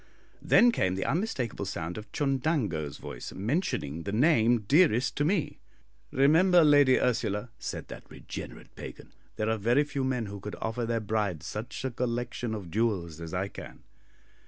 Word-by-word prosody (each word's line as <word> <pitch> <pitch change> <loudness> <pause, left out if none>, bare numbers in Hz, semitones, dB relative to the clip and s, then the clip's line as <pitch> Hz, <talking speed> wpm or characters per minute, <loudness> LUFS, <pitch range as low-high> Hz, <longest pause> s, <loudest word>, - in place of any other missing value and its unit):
Then 240 +1 +6
came 95 - 0
the 95 - -2
unmistakable 135 - -1
sound 85 -2 -4
of 110 0 -9
Chundango's 130 - -1
voice - - -8
mentioning 95 - -2
the 100 - -4
name 120 -2 +4
dearest 130 - +3
to 145 - +2
me. 150 -3 0 0.5
"Remember, 165 +6 +5
Lady 145 -3 +6
Ursula," 115 -2 0
said - - -5
that - - -10
regenerate - - -9
pagan, - - -10 0.2
"there 110 - -1
are 110 - 0
very 120 +8 +3
few 140 -2 -3
men 130 -3 -1
who 100 0 -7
could 105 +2 -6
offer 115 +1 -2
their 115 -1 0
brides 105 -6 -1
such 115 +4 -5
a 130 - -1
collection 120 -1 -2
of 95 -6 -8
jewels 95 -7 -1
as 80 -1 -6
I 95 +2 -1
can. - - -11
115 Hz, 160 wpm, -29 LUFS, 100-140 Hz, 0.5 s, Then